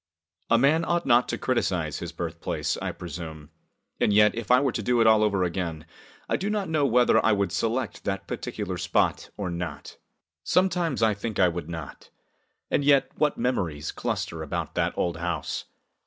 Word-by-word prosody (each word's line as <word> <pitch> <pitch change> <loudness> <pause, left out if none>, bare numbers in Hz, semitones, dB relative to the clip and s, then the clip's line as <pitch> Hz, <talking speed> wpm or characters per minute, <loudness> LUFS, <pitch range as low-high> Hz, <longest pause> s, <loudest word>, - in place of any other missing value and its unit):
A 115 - +5
man 150 +7 +3
ought 170 0 0
not 120 -1 +4
to - - -1
criticise - - -1
his - - -5
birthplace, - - -3
I - - -2
presume, 80 -4 -8 0.5
and - - +3
yet, 105 0 +5
if 115 -2 -6
I 125 +1 +6
were 135 -2 +1
to 115 - -3
do 120 +3 +1
it 115 - +5
all 110 -1 +6
over 100 -3 +2
again, 85 -3 -3 0.4
I - - +1
do 200 - -2
not 210 -2 -1
know 150 -3 +2
whether 125 0 +4
I 110 - +4
would 100 -3 0
select 115 +6 -2
that 95 -1 -2
particular 95 -4 -4
spot 85 -2 0
or 95 -4 -3
not. 85 0 -6 0.5
Sometimes 175 -9 +1
I 110 -1 +4
think 105 +2 -5
I 90 -2 +5
would 85 0 -5
not. 80 -4 -8 0.6
And - - +2
yet, 140 -1 +4
what 150 -2 +2
memories 85 - -1
cluster 80 - -3
about 80 - -4
that - - -1
old 85 -2 0
house! 85 -3 -3
105 Hz, 185 wpm, -26 LUFS, 85-130 Hz, 0.6 s, I